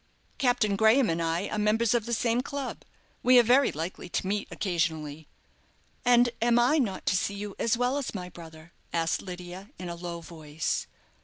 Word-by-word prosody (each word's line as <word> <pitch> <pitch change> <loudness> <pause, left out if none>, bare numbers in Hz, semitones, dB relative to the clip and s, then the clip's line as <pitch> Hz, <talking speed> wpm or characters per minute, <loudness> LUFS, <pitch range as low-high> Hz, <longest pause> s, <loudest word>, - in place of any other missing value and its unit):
"Captain 245 -6 +2
Graham 220 +2 +4
and 165 +1 -1
I 165 +4 -1
are 215 - -2
members 215 +2 +2
of 235 -2 0
the 235 - -2
same 235 +2 +1
club. 280 -1 -5 0.4
We 250 0 +6
are 240 - +8
very 255 +4 +4
likely 165 +3 -5
to - - -2
meet 200 +2 -1
occasionally." 160 -5 -2 0.8
"And 245 0 +5
am 235 0 +4
I 250 +6 +4
not 200 -8 -2
to - - +2
see 200 +2 0
you 205 0 -6
as 230 0 +1
well 250 +3 +1
as 270 - -5
my 180 -2 -4
brother?" 165 -1 -13 0.2
asked 165 -1 0
Lydia, 180 +2 -8
in 180 - -6
a 170 - -4
low 170 0 -6
voice. 160 -2 -4
200 Hz, 185 wpm, -28 LUFS, 170-240 Hz, 0.8 s, are